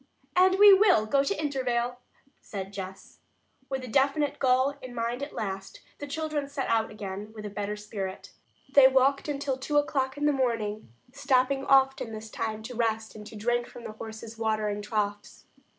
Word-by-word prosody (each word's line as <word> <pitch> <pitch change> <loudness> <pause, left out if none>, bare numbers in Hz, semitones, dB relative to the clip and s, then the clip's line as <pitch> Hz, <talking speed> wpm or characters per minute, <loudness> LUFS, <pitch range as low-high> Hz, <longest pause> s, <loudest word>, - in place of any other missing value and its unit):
"And 370 +1 +5
we 410 0 +9
will 380 - +5
go 275 +5 +2
to 355 +6 -2
Intervale," 250 -4 -1 0.4
said 195 -1 -7
Jess. 190 -1 -8 0.5
With 265 -1 -3
a - - -6
definite 280 +4 +1
goal 260 +1 +3
in 250 -1 -9
mind 235 +2 -2
at 280 - -4
last, 195 -2 -5 0.2
the 290 - -6
children 305 -1 -3
set 280 -1 -3
out 225 -1 +2
again 205 0 -7
with 210 -1 -8
a 205 - -5
better 205 +1 -3
spirit. 200 -2 -6 0.4
They 275 -2 +9
walked 265 +2 +3
until 275 -2 -2
two 295 +3 -1
o'clock 275 -2 0
in 295 - -1
the 295 - +5
morning, 225 - -1 0.2
stopping 270 0 +1
often 270 -4 +3
this 220 0 -8
time 220 -1 -3
to 250 +2 -7
rest 225 -1 -1
and 210 -1 -10
to 220 - -11
drink 240 +3 0
from 240 - -12
the - - -6
horses' 220 +1 -9
watering 215 -2 -1
troughs. 205 0 -3
240 Hz, 180 wpm, -28 LUFS, 215-275 Hz, 0.5 s, we